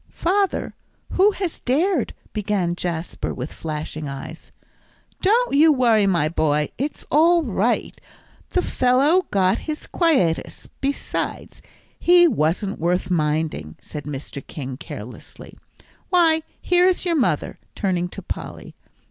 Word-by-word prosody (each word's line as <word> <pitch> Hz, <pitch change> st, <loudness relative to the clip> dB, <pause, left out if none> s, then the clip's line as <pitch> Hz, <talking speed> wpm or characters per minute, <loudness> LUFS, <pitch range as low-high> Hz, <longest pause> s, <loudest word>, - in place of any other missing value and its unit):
"Father, 390 Hz, +3 st, 0 dB, 0.4 s
who 385 Hz, +3 st, +5 dB
has 370 Hz, -5 st, -4 dB
dared 305 Hz, -, 0 dB
" -, -, -30 dB
began 200 Hz, -5 st, -1 dB
Jasper, 170 Hz, -1 st, -4 dB
with 130 Hz, +4 st, -6 dB
flashing 155 Hz, -1 st, -5 dB
eyes. 140 Hz, +4 st, -8 dB, 0.7 s
"Don't 460 Hz, -, +3 dB
you 310 Hz, +3 st, +6 dB
worry, 230 Hz, -7 st, +3 dB
my 170 Hz, -6 st, +2 dB
boy; 150 Hz, -2 st, +1 dB
it's 290 Hz, +3 st, -3 dB
all 335 Hz, +3 st, +5 dB
right, 230 Hz, -1 st, -1 dB, 0.5 s
the 365 Hz, -, 0 dB
fellow 275 Hz, +9 st, +3 dB
got 190 Hz, 0 st, +2 dB
his 305 Hz, -, -4 dB
quietus; 270 Hz, -, +1 dB
besides, 280 Hz, +1 st, -3 dB, 0.4 s
he 350 Hz, 0 st, +6 dB
wasn't 195 Hz, -, 0 dB
worth 180 Hz, +2 st, 0 dB
minding," 150 Hz, -, -1 dB
said 150 Hz, -2 st, -8 dB
Mr. 140 Hz, -1 st, -6 dB
King, 135 Hz, -5 st, -6 dB
carelessly. 120 Hz, -2 st, -10 dB, 0.5 s
"Why, 330 Hz, -3 st, +4 dB, 0.2 s
here 360 Hz, 0 st, +3 dB
is 370 Hz, 0 st, +1 dB
your 345 Hz, -2 st, +1 dB
mother," 270 Hz, -6 st, 0 dB, 0.2 s
turning 180 Hz, -3 st, -1 dB
to -, -, -9 dB
Polly. -, -, -7 dB
210 Hz, 125 wpm, -22 LUFS, -, 0.7 s, you